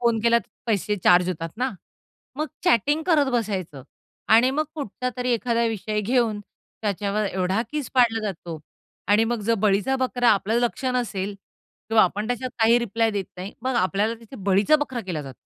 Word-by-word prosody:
Phone 235 -2 +2
केला 235 0 +4
तर - - -14 0.2
पैसे 210 -2 0
चार्ज 180 0 +5
होतात 165 -2 -3
ना. 255 +2 0 0.7
मग 305 +2 -1 0.2
चॅटिंग 295 - +3
करत 295 -6 +3
बसायचं. 190 - -2 0.5
आणि 235 +4 +6
मग 310 - +2
कुठचा 255 -3 -4
तरी 250 0 -1
एखादा 235 0 +1
विषय 215 -1 -2
घेऊन 225 -1 +1 0.4
त्याच्यावर 205 0 -1
एवढा 190 +3 0
किस 300 -3 -4
पाडला 235 -3 +4
जातो 170 -4 -6 0.5
आणि 210 +2 +4
मग 235 -1 -2
जर 230 +3 +2
बळीचा 210 +7 +2
बकरा 250 -2 +1
आपल्या 210 +2 +1
लक्ष 240 +2 -1
नसेल 205 -5 -2 0.5
किंवा 225 0 +5
आपण 205 +4 0
त्याच्यात 245 +2 -3
काही 230 +2 +5
रिप्लाय 230 -1 0
देत 200 -3 -2
नाही. 185 +3 -6
मग 260 0 -1
आपल्याला 205 +3 +1
तिथे 230 +4 -12
बळीचा 200 +11 +4
बकरा 255 -3 -5
केला 180 -7 -4
जातो. 135 -2 -10
225 Hz, 175 wpm, -24 LUFS, 200-245 Hz, 0.7 s, आणि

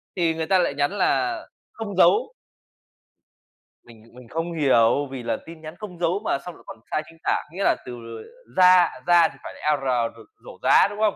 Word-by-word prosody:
thì 170 -3 +1
người 160 0 -3
ta 190 +1 +3
lại 170 - +1
nhắn 145 +5 0
là 135 -9 +1 0.4
không 205 -4 -5
dấu. 450 - +4 1.5
Mình 115 -2 -17
mình 125 -1 -14
không 165 +1 -3
hiểu 140 -2 +3
vì 130 -3 -6
là - - -1
tin 165 -1 -12
nhắn 155 +1 -9
không 185 -5 -9
dấu 180 +4 0
mà - - +1
xong 180 - -8
lại - - -18
còn 110 - -10
sai 155 - 0
chính 165 - -17
tả, - - 0
nghĩa 195 +3 -4
là - - +3
từ, 125 - -7
ờ, 115 -1 -9 0.3
ra 180 -1 +6 0.2
ra 170 -2 +6
thì - - -14
phải - - -8
là 150 -1 0
"r" 135 - -10 0.3
r - - -19 0.3
rổ - - -11
rá, - - +5
đúng 205 +1 -9
không? 215 -2 +2
165 Hz, 215 wpm, -23 LUFS, 135-180 Hz, 1.5 s, ra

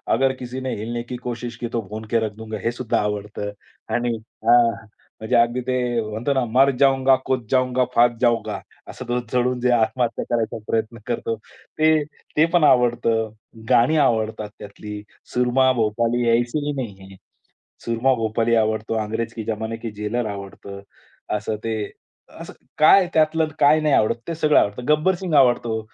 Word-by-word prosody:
"अगर 135 0 +2
किसीने 130 +1 -4
हिलने 120 +3 -4
की 125 +1 -7
कोशिश 120 -1 -5
की 120 - -4
तो 115 - 0
भूनके 110 +2 -2
रख 105 - -4
दुंगा", 110 -1 -6
हे 115 - +2
सुद्धा 120 -1 -1
आवडतं 105 0 -4 0.4
आणि 120 -1 0 0.3
हां, 115 -2 +4 0.4
म्हणजे 110 - 0
अगदी 120 +2 +3
ते 130 - +1 0.3
म्हणतो 115 +6 -1
ना 130 -2 +1
"मर 130 +4 +4
जाऊंगा, 135 -1 +4
कूद 130 -3 -1
जाऊंगा, 130 -1 +2
फांद 120 0 +4
जाऊंगा". 120 -3 +1 0.3
असं 130 - -8
तो 120 0 0
चढून 125 0 +1
जे 125 - +2
आत्महत्या 120 +1 +1
करायचा 115 -2 -1
प्रयत्न 115 +1 -1
करतो. 115 -1 -2
ते, 155 +7 -1 0.3
ते 155 - +6
पण 175 -3 +4
आवडतं. 120 -4 +3 0.4
गाणी 125 +7 +4
आवडतात 110 -6 +1
त्यातली. 105 0 -8 0.3
सूरमा 125 +1 +3
भोपाली 115 +1 0
ऐसे 120 +5 +1
ही 145 - -1
नहीं 120 -8 -5
है, 95 - -13 0.7
सूरमा 120 +3 +2
भोपाली 115 0 0
आवडतो, 110 0 0
अंग्रेज 115 +2 -3
के 110 - -5
जमाने 110 +1 -3
के 115 0 -6
जेलर 110 +2 -1
आवडतं. 100 0 -8 0.6
असं 105 +1 -3
ते 115 0 -1 0.7
असं - - -8 0.3
काय 155 +5 +7
आहे 180 - -1
त्यातलं, 155 0 +2
काय 150 +2 +5
नाही 150 -2 +2
आवडत, 110 +2 +3
ते 165 - -2
सगळं 155 -1 +3
आवडतं. 105 +5 0
गब्बर 155 +5 +3
सिंग 175 -4 -2
आवडतो, 120 -4 +3
120 Hz, 165 wpm, -22 LUFS, 110-130 Hz, 0.7 s, काय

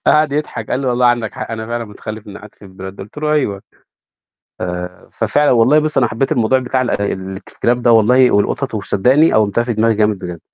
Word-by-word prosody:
قعد 150 -2 +3
يضحك، 150 +1 -4
قال 125 - 0
لي: 135 - -3
"والله 125 0 +2
عندك 120 -3 0
حق - - -6
أنا 110 0 -5
فعلًا 120 0 -3
متخلف، 110 0 -9
إنّي 100 - -9
قعدت 105 - -14
في - - -25
البلد 95 0 -10
دي." - - -7
قُلت 105 +9 -12
له: 150 0 -1
"أيوه." 100 -10 -1 1.0
آآ 90 0 -6
ففعلًا 145 0 +1
والله 125 +5 +4
بُص، 155 -1 0
أنا 120 - +3
حبّيت 135 +7 -1
الموضوع 125 -1 +2
بتاع 130 0 -1
ال-الكلاب 100 +3 -2
ده 120 - +4
والله 125 +3 +5
والقطط 110 +5 0
وصدّقني 125 +9 +2
قوِّمتها 110 +2 +2
في 120 - -2
دماغي 115 +1 +2
جامد 105 -1 +1
بجد. 90 -2 -7
115 Hz, 205 wpm, -16 LUFS, 100-130 Hz, 1.0 s, والله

